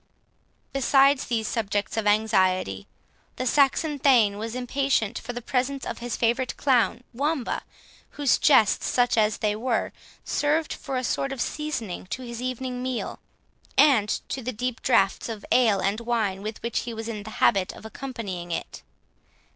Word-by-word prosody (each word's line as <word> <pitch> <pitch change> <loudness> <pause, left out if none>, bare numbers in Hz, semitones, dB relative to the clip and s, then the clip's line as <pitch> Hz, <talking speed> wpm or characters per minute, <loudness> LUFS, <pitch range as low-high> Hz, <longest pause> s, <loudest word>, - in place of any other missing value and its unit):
Besides 275 +1 +4
these 225 -3 -1
subjects 205 -3 -2
of 220 -2 -1
anxiety, 185 - +2 0.5
the 255 - -3
Saxon 285 +3 +2
thane 230 -7 +4
was 225 +2 -4
impatient 250 -3 0
for 235 - -6
the 245 0 -7
presence 265 +2 -1
of - - -5
his 240 -1 -4
favourite 240 +2 0
clown 250 -3 +2
Wamba, 280 +1 -1 0.6
whose 285 -4 +3
jests, 225 -9 +4
such 245 -1 +2
as 215 -1 +2
they 210 -1 0
were, 230 +1 -1 0.3
served 305 +2 0
for 275 -3 -4
a 255 - -2
sort 275 +3 -1
of 270 - -5
seasoning 245 -12 -3
to 260 - -5
his 235 -1 -6
evening 255 0 -3
meal, 255 -1 -3 0.6
and 260 -8 +5 0.2
to 265 - -3
the 255 +1 -3
deep 250 +1 -3
draughts 195 +4 +2
of 220 -3 -6
ale 220 -6 +4
and 200 +3 0
wine 225 -5 -1
with 215 +1 -6
which 235 -1 -1
he 235 -1 -5
was 225 0 -5
in 220 -2 -4
the 210 - -9
habit 195 -2 +3
of - - -13
accompanying 220 -7 -6
it. 165 - -5
235 Hz, 165 wpm, -25 LUFS, 215-260 Hz, 0.6 s, and